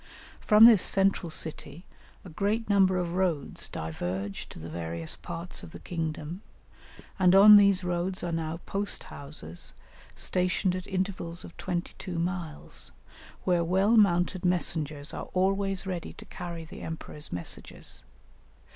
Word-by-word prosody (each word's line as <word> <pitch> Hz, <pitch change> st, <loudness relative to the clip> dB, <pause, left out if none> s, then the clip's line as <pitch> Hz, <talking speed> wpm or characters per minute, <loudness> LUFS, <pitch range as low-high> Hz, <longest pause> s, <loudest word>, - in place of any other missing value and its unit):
From 215 Hz, +1 st, +7 dB
this 225 Hz, -5 st, +8 dB
central 195 Hz, -3 st, +2 dB
city 160 Hz, +1 st, -6 dB, 0.4 s
a -, -, -8 dB
great 205 Hz, +7 st, -1 dB
number 190 Hz, -2 st, +4 dB
of 175 Hz, -1 st, -2 dB
roads 175 Hz, -6 st, 0 dB
diverge 90 Hz, +5 st, -4 dB
to -, -, -10 dB
the 80 Hz, -, -8 dB
various 85 Hz, 0 st, -4 dB
parts 170 Hz, +1 st, -7 dB
of 160 Hz, -, -11 dB
the -, -, -8 dB
kingdom, 165 Hz, +1 st, -4 dB, 0.8 s
and 185 Hz, 0 st, +5 dB
on 210 Hz, +2 st, +10 dB
these 200 Hz, -2 st, +6 dB
roads 180 Hz, +1 st, -1 dB
are 175 Hz, -, -2 dB
now 165 Hz, 0 st, -2 dB
post 200 Hz, +1 st, -1 dB
houses 140 Hz, -, -6 dB, 0.4 s
stationed 180 Hz, 0 st, 0 dB
at 185 Hz, -, -6 dB
intervals 185 Hz, -3 st, -3 dB
of 170 Hz, -, -12 dB
twenty 175 Hz, -2 st, -3 dB
two 180 Hz, -2 st, -5 dB
miles, 170 Hz, -2 st, -4 dB, 0.5 s
where 175 Hz, -2 st, +2 dB
well 190 Hz, +6 st, +3 dB
mounted 185 Hz, -3 st, +3 dB
messengers 155 Hz, -5 st, 0 dB
are -, -, -6 dB
always 195 Hz, +1 st, +1 dB
ready 180 Hz, -3 st, -4 dB
to -, -, -12 dB
carry 170 Hz, -2 st, -7 dB
the -, -, -10 dB
emperor's 160 Hz, -2 st, -7 dB
messages. 90 Hz, -1 st, -3 dB
175 Hz, 140 wpm, -28 LUFS, 160-190 Hz, 0.8 s, on